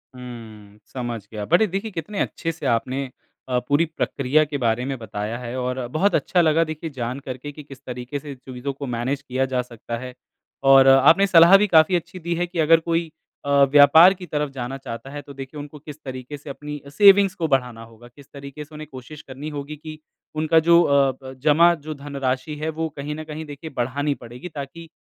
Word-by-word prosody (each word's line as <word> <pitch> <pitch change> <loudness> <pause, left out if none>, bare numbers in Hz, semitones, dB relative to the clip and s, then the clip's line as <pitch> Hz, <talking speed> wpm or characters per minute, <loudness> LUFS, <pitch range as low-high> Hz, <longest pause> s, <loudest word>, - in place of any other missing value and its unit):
हम्म, 110 -4 -11 0.2
समझ 120 -4 -4
गया। 105 -2 -5
बड़े 210 +5 +5
देखिए 195 +4 -4
कितने 185 +4 -5
अच्छे 165 - -2
से 160 -3 -9
आपने 130 +3 -3 0.4
अ, 125 -1 +1
पूरी 145 +6 +1
प्रक्रिया 155 -2 0
के 145 -1 -4
बारे 120 -1 0
में 135 -1 -3
बताया 110 0 -5
है 125 0 -6
और 125 0 -3
बहुत 195 +6 +2
अच्छा 180 - +2
लगा 160 0 +3
देखिए 155 0 -5
जान 125 +3 -3
करके 130 +2 -7
कि 150 +1 -11
किस 135 -2 -13
तरीके 125 +3 -5
से 145 0 -8
चीज़ों 130 +1 -6
को 140 +1 -7
मैनेज 125 +4 -2
किया 130 -1 -1
जा 130 -1 -1
सकता 115 -1 -7
है। 125 +1 -8 0.6
और 135 0 +7
आपने 140 +9 +6
सलाह 170 +1 +8
भी 210 +1 +2
काफ़ी 160 +1 +5
अच्छी 175 +2 -4
दी 170 0 -3
है 175 +1 0
कि 175 -1 -6
अगर 165 +1 +5
कोई 165 -1 -2 0.3
अ, - - -3 0.2
व्यापार 155 +6 +8
की 180 -1 -10
तरफ 150 -3 -2
जाना 130 0 -5
चाहता 130 0 -8
है 145 +1 -7
तो 140 - -12
देखिए 135 +2 -8
उनको 145 +1 -9
किस 150 +1 -11
तरीके 130 +2 -7
से 145 +1 -12
अपनी 150 +1 -7
सेविंग्स 195 +3 +6
को 165 - -1
बढ़ाना 125 -5 -1
होगा, 115 +1 -15
किस 135 +3 -18
तरीके 140 +1 -9
से 155 - -15
उन्हें 155 0 -8
कोशिश 135 +4 -10
करनी 140 +3 -8
होगी 145 +2 -6
कि 155 0 -10 0.4
उनका 160 +1 +3
जो 170 0 +7
अ, 140 -2 +3
ब 130 0 -8
जमा 165 +3 +5
जो 155 - -4
धनराशि 140 0 -3
है 160 - -1
वो 160 +1 -3
कहीं 145 +2 -4
न 155 - -6
कहीं 155 0 -7
देखिए 145 +2 -9
बढ़ानी 140 +4 -1
पड़ेगी 125 +9 -9
ताकि 155 +3 -8
145 Hz, 210 wpm, -22 LUFS, 130-160 Hz, 0.6 s, सलाह